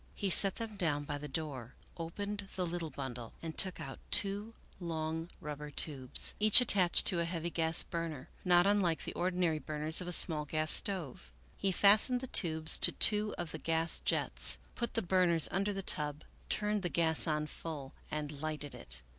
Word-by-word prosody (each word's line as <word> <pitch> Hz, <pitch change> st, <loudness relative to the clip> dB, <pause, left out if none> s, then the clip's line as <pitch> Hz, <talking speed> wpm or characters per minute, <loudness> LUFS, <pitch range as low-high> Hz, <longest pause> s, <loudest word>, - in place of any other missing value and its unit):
He 195 Hz, -2 st, -3 dB
set 195 Hz, +1 st, +4 dB
them 225 Hz, -3 st, -8 dB
down 150 Hz, -5 st, -2 dB
by 145 Hz, 0 st, -6 dB
the 150 Hz, -, -8 dB
door, 135 Hz, -5 st, -7 dB, 0.2 s
opened 200 Hz, +4 st, -6 dB
the 185 Hz, -, -3 dB
little 170 Hz, -1 st, -5 dB
bundle, 125 Hz, -4 st, -8 dB
and 160 Hz, -1 st, -7 dB
took 185 Hz, -2 st, -2 dB
out 140 Hz, -4 st, -9 dB
two 205 Hz, +3 st, +1 dB, 0.2 s
long 160 Hz, -1 st, -5 dB
rubber 150 Hz, 0 st, -8 dB
tubes, 135 Hz, -3 st, -3 dB
each 215 Hz, +2 st, +8 dB
attached 195 Hz, -8 st, +2 dB
to 175 Hz, -, +1 dB
a -, -, 0 dB
heavy 170 Hz, 0 st, -5 dB
gas 165 Hz, -1 st, 0 dB
burner, 165 Hz, -6 st, -7 dB, 0.2 s
not 175 Hz, -1 st, +3 dB
unlike 195 Hz, -5 st, 0 dB
the -, -, -7 dB
ordinary 175 Hz, -3 st, -2 dB
burners 155 Hz, +2 st, +2 dB
of 180 Hz, -, -7 dB
a -, -, -3 dB
small 160 Hz, -3 st, +7 dB
gas 155 Hz, +1 st, -1 dB
stove. 150 Hz, -, +1 dB, 0.2 s
He 195 Hz, -, -2 dB
fastened 210 Hz, +7 st, +3 dB
the 260 Hz, -, -7 dB
tubes 160 Hz, -9 st, +2 dB
to -, -, +8 dB
two 210 Hz, 0 st, +4 dB
of 175 Hz, -2 st, -6 dB
the 160 Hz, -, -8 dB
gas 165 Hz, +1 st, -1 dB
jets, -, -, -2 dB, 0.2 s
put 235 Hz, -, -5 dB
the 225 Hz, -, -1 dB
burners 175 Hz, -3 st, +4 dB
under 200 Hz, +2 st, -2 dB
the 195 Hz, -1 st, -6 dB
tub, 150 Hz, -3 st, -2 dB, 0.3 s
turned 210 Hz, 0 st, -1 dB
the 175 Hz, -, -3 dB
gas 160 Hz, 0 st, +3 dB
on 150 Hz, -1 st, -2 dB
full, 150 Hz, -3 st, -8 dB, 0.2 s
and 150 Hz, -1 st, -6 dB
lighted 155 Hz, -2 st, -5 dB
it. -, -, -7 dB
165 Hz, 185 wpm, -31 LUFS, 150-190 Hz, 0.3 s, each